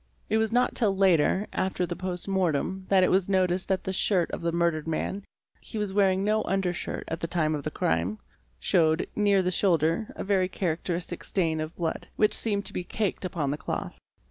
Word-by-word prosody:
It 220 - +3
was 220 0 +1
not 245 +2 +2
till 205 -5 +1
later, 190 +1 +3
after 185 -1 0
the 175 0 -4
post 180 0 -4
mortem, 190 0 0
that 190 -1 +5
it - - +3
was 190 0 +2
noticed 185 -1 +1
that 190 -1 0
the 190 - -3
shirt 185 -2 +2
of - - -4
the 170 0 0
murdered 170 -2 0
man 190 +5 -2 0.4
(he - - -7
was 210 -2 -2
wearing 195 -1 +3
no 215 +1 +2
under 190 -2 0
shirt - - -4
at 165 - -3
the 165 - -3
time 160 -2 0
of 150 - -2
the 155 - -2
crime) 85 - 0 0.4
showed, 160 - +2
near 200 -2 +3
the 180 - 0
shoulder, 170 +1 +2
a - - -4
very 190 -2 +2
characteristic 175 -1 -3
stain 165 -5 0
of 155 +1 -5
blood, 165 -2 -3
which 215 - +3
seemed 205 -3 +1
to - - -1
be 180 - -3
caked 200 0 -2
upon 155 -6 -1
the 145 - -2
cloth. - - -4
185 Hz, 210 wpm, -27 LUFS, 165-195 Hz, 0.4 s, that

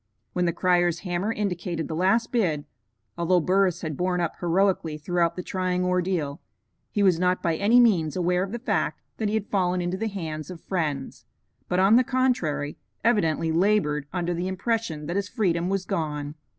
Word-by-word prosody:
When 180 0 +1
the 170 - +2
crier's 175 -1 +2
hammer 185 +3 -1
indicated 180 -6 -2
the - - -4
last 195 +7 +2
bid, 170 -12 0 0.5
although 175 +1 +3
Burris 185 0 +2
had 155 -3 -3
borne 180 +3 0
up 170 -2 -1
heroically 175 -3 +1
throughout 170 +2 0
the 180 - -5
trying 180 -1 -1
ordeal, 180 -4 -1 0.5
he 205 - 0
was 180 -4 +4
not 180 0 +1
by 165 -2 +1
any 215 +8 +4
means 180 - +3
aware 180 0 +1
of 190 +1 -3
the 235 - -3
fact 240 - -1 0.2
that 220 - -1
he 215 - 0
had 215 -2 -3
fallen 180 -2 +1
into 175 +1 -2
the 225 +3 -2
hands 160 -7 -5
of 180 -2 -8
friends, 155 -7 -3 0.4
but, 180 - +1
on 195 +5 +6
the 255 - +5
contrary, 245 - 0 0.3
evidently 165 -8 +2
labored 160 -5 +2
under 175 -1 -1
the 175 +2 -2
impression 190 -5 -2
that 175 +5 -2
his 200 - -2
freedom 180 -6 0
was 195 -1 -1
gone. 150 -3 -3
180 Hz, 185 wpm, -25 LUFS, 165-195 Hz, 0.5 s, on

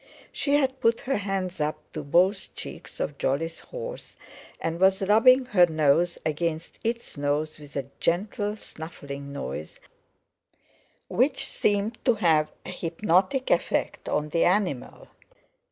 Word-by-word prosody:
She 285 0 +1
had 265 -2 +1
put 230 0 +2
her 275 -2 0
hands 190 -4 -2
up 150 +1 0 0.2
to 155 - -4
both 185 +7 +2
cheeks - - -9
of 140 -1 -3
Jolly's 165 +5 -1
horse, - - -8 0.4
and 165 +1 -2
was 190 +1 +4
rubbing 250 +6 +6
her 185 -8 +5
nose 160 +2 +2
against 160 +1 -2
its 230 -6 -3
nose 145 +2 -1
with 145 -1 -13
a 140 -2 -2
gentle 205 +4 0
snuffling 140 -7 -8
noise 80 - -6 1.3
which 270 +2 +1
seemed 210 -2 0
to 245 -3 +4
have 155 -5 +3
an - - -5
hypnotic 185 +8 +1
effect - - 0
on 150 0 0
the 165 +2 +2
animal. 180 -8 0
180 Hz, 135 wpm, -26 LUFS, 155-220 Hz, 1.3 s, rubbing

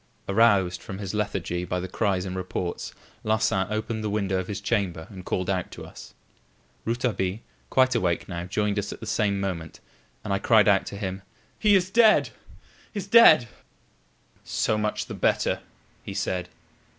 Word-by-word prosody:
Aroused 100 -4 +3
from 95 - -7
his 100 -1 -5
lethargy 95 -4 -2
by 90 0 -2
the 90 - -4
cries 95 -1 0
and 95 -1 -5
reports, 90 -1 -4 0.3
Larsan 110 -3 +1
opened 110 +1 -3
the 105 - -1
window 100 -2 0
of 95 - -4
his 100 -2 -4
chamber 100 -6 -1
and 95 -2 -9
called 90 -1 -2
out 95 -2 -1
to - - -8
us. - - -12 0.7
Rouletabille, 115 -5 -1 0.3
quite 130 0 +4
awake 90 -8 0
now, 85 -1 -5
joined 105 +2 0
us 100 - -4
at - - -8
the - - -8
same 100 -3 0
moment, 90 -5 -4 0.4
and 100 - -2
I 100 - +1
cried 110 -1 +4
out 100 -2 +4
to 100 - -6
him: 95 -1 -4 0.4
"He 210 -2 +5
is 185 -1 +2
dead! 225 0 +5 0.6
is 200 -3 -3
dead!" 200 - +7 1.0
"So 110 - 0
much 105 0 -1
the - - -7
better," - - +1 0.4
he 100 - -7
said. 90 -3 -2
100 Hz, 170 wpm, -26 LUFS, 95-110 Hz, 1.0 s, dead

